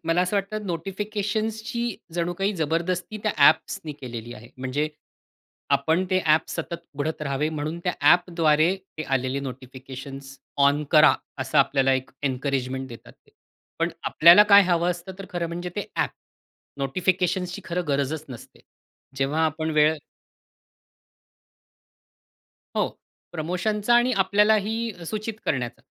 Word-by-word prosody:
मला 165 +2 +2
असं 185 +3 -1
वाटतं 205 +1 -3
नोटिफिकेशन्सची 210 +5 -3 0.3
जणू 175 0 -1
काही 195 +2 +1
जबरदस्ती 170 +5 -1
त्या 215 - +1 0.2
ॲप्सनी 155 -2 -1
केलेली 120 -2 -7
आहे. 115 +2 -13
म्हणजे, 130 +4 -2 0.9
आपण 160 +6 +1
ते 185 - +3
ॲप 155 +1 +3
सतत 170 - -4 0.2
उघडत 150 +2 -3
राहावे 140 +1 -1
म्हणून 155 +2 -4
त्या 180 - +1
ॲपद्वारे 165 +1 +4
ते 190 -4 -9
आलेले 130 +2 -2
नोटिफिकेशन्स 135 +1 -9 0.3
ऑन 145 +1 +2
करा 155 -1 +7 0.2
असं - - 0
आपल्याला 135 -1 +3
एक 130 0 -3
एन्करेजमेंट 130 -1 -2
देतात 115 -2 -12
ते. - - -25 0.5
पण - - +1
आपल्याला 170 +5 +8
काय 200 0 +10
हवं 175 -1 +2
असतं 175 +2 -6
तर 195 - -8
खरं 175 -1 -2
म्हणजे 175 +1 -5
ते 205 - -3
ॲप. - - +1 0.7
नोटिफिकेशन्सची 180 +6 0
खरं 180 0 -2
गरजच 145 +2 -1
नसते. 120 -3 -11 0.6
जेव्हा 145 +4 +1
आपण 160 +1 -2
वेळ 155 0 +4 2.8
हो, - - +2 0.4
प्रमोशनचा 190 +7 0
आणि 240 +1 +4
आपल्यालाही 210 0 +1
सूचित 215 +3 -4
करण्याचं 120 -3 -2
165 Hz, 125 wpm, -25 LUFS, 140-190 Hz, 2.8 s, काय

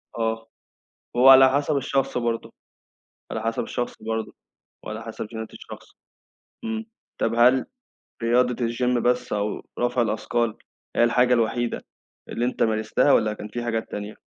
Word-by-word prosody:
آه، 115 0 -2 0.7
هو 130 +2 +7
على 135 0 +9
حسب 145 +2 +1
الشخص 135 0 0
برضه، 115 -1 -2 0.8
على 110 - -3
حسب 115 0 -1
الشخص 120 -2 -4
برضه، 110 0 -3 0.5
وعلى 110 +1 -6
حسب 115 -1 -6
چينات 110 0 -7
الشخص، - - -11 0.8
امم، 225 0 -3 0.3
طَب 115 - +1
هل 125 +2 +5 0.6
رياضة 125 +1 +3
الgym 125 +1 0
بس 125 -1 0
أو 105 0 -2 0.2
رفع 120 0 +1
الأثقال 115 0 -1 0.4
هي - - +4
الحاجة 125 +1 +4
الوحيدة 120 0 0 0.5
اللي 120 +1 -1
أنت 125 - 0
مارستها، 110 +5 +2
والّا 110 -1 +3
كان 105 0 -8
في 120 +3 -5
حاجات 115 -1 -2
تانية؟ 105 +1 -5
120 Hz, 145 wpm, -24 LUFS, 110-125 Hz, 0.8 s, على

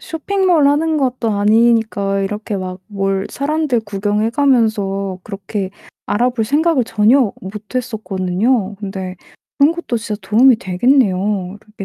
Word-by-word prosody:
쇼핑몰 350 -1 +1
하는 310 +3 +2
것도 255 -5 0
아니니까 215 -1 +2
이렇게 210 +1 -3
막 185 -1 -6
뭘 195 -1 -2
사람들 290 -3 0
구경해 205 +1 -1
가면서 215 -8 +1
그렇게 195 -1 -5 0.4
알아볼 240 +1 0
생각을 295 +3 +2
전혀 225 +2 +3
못 205 +4 -9
했었거든요. 215 -2 -1
근데 190 -2 -6 0.4
그런 290 +3 +5
것도 335 -8 -3
진짜 215 -2 -5
도움이 230 +6 +5
되겠네요. 195 -2 +1
이렇게 210 -2 -10
215 Hz, 305 characters per minute, -17 LUFS, 195-255 Hz, 0.4 s, 그런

